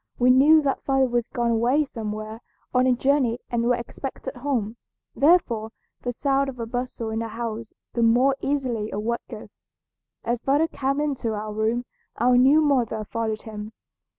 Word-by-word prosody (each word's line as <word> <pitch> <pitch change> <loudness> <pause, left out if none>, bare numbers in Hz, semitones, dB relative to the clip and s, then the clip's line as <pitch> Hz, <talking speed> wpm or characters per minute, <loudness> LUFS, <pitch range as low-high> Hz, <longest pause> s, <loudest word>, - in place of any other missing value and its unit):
We 250 +1 +5
knew 300 +5 +6
that 275 -1 0
father 270 -1 +2
was 240 -2 -1
gone 235 -1 -1
away 245 +7 +2
somewhere 215 -2 -6 0.3
on 250 +1 +3
a 255 - +4
journey 260 -2 +2
and 235 -1 0
was 245 - +3
expected 265 +2 -7
home, 240 -4 -2 0.4
therefore 245 -7 +3 0.3
the 245 - -2
sound 275 +2 0
of 250 -2 -9
a 230 - -2
bustle 240 -1 -4
in 220 - -2
the 230 - -3
house 225 0 -5 0.2
the 235 - -1
more 245 +4 +4
easily 255 -6 -1
awoke 225 +3 -2
us. - - -11 0.6
As 240 0 -1
father 290 +4 +2
came 275 -2 -2
into 260 -7 -2
our 210 0 -5
room 220 +3 0 0.3
our 245 +2 +3
new 270 +5 +6
mother 245 -7 +1
followed 220 0 -3
him. 215 0 -8
240 Hz, 170 wpm, -24 LUFS, 225-270 Hz, 0.6 s, knew